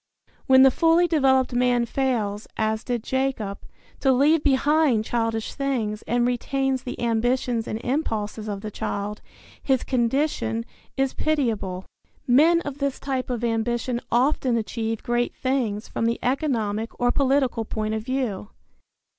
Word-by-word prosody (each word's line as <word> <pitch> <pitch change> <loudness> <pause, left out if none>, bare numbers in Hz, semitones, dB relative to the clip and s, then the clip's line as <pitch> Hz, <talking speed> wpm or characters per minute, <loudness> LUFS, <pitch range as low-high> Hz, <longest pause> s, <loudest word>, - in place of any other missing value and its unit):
When 260 -1 +7
the 270 - +7
fully 330 +4 +3
developed 265 -5 +3
man 245 -1 +2
fails, 230 -5 -1
as 220 0 0
did 240 -3 -2
Jacob, 260 -7 -2 0.4
to 270 - +3
leave 290 +5 +3
behind 280 -4 +3
childish 225 -2 -1
things 230 -6 -2
and 240 0 +2
retains 265 +2 0
the 250 - -7
ambitions 235 0 0
and 215 - -3
impulses 220 -6 -2
of 200 -1 -4
the 215 0 -6
child, 205 +1 -4 0.4
his 265 -2 +1
condition 235 - 0 0.3
is 270 -1 +1
pitiable. 225 -12 -1 0.4
Men 315 +7 +5
of 285 -2 -6
this 280 -1 -1
type 265 -2 -3
of 240 -2 -3
ambition 235 +1 -1
often 250 0 +2
achieve 225 0 -3
great 240 0 -1
things 240 -5 -1
from 230 - -1
the 235 - 0
economic 230 -6 -1
or 245 0 +3
political 265 -4 +1
point 215 0 -3
of 220 - -2
view. 245 - -2
245 Hz, 140 wpm, -24 LUFS, 220-270 Hz, 0.4 s, When